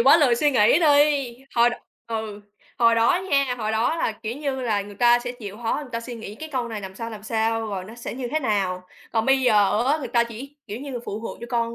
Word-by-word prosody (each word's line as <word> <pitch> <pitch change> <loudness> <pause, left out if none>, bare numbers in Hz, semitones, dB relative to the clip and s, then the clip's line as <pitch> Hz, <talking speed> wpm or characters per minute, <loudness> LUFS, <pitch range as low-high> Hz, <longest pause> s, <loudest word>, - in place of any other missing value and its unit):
quá 270 +6 +7
lười 285 -7 +4
suy 295 +5 +2
nghĩ 255 +3 +5
đi, 290 -5 +3 0.2
hồi 235 0 +5
đ - - -5 0.3
ừ, 220 -2 -4 0.4
hồi 230 -1 +5
đó 235 +11 +3
nha, 275 -3 +2
hồi 215 -1 -2
đó 225 +9 +1
là, 275 - 0
kiểu 225 +2 -4
như, 280 -3 -3
là 215 -5 0
người 205 +1 -11
ta 240 +3 +5
sẽ 245 0 -5
chịu 210 -5 -9
khó, 225 - 0
người 285 -4 -10
ta 230 - -2
suy 240 +1 -7
nghĩ 220 -3 -8
cái 315 +8 -8
câu 250 -3 -1
này 220 -2 -5
làm 190 -1 -8
sao, 230 +3 -6
làm 215 -2 -9
sao, 225 0 0
rồi 195 -3 -4
nó 215 +4 -11
sẽ 235 -1 -6
như 245 -1 -4
thế 310 - 0
nào. 190 -7 -1 0.3
Còn 225 -1 +1
bây 270 0 +4
giờ 215 -2 +3
á, 295 +4 +3
người 265 -5 -5
ta 235 0 +3
chỉ, 245 +5 -9
kiểu 215 +2 -6
như 280 0 -7
là, 250 - -4
phụ 210 -1 -5
thuộc 225 - -6
vô 235 - -6
con 235 -1 0
235 Hz, 270 wpm, -24 LUFS, 220-265 Hz, 0.4 s, quá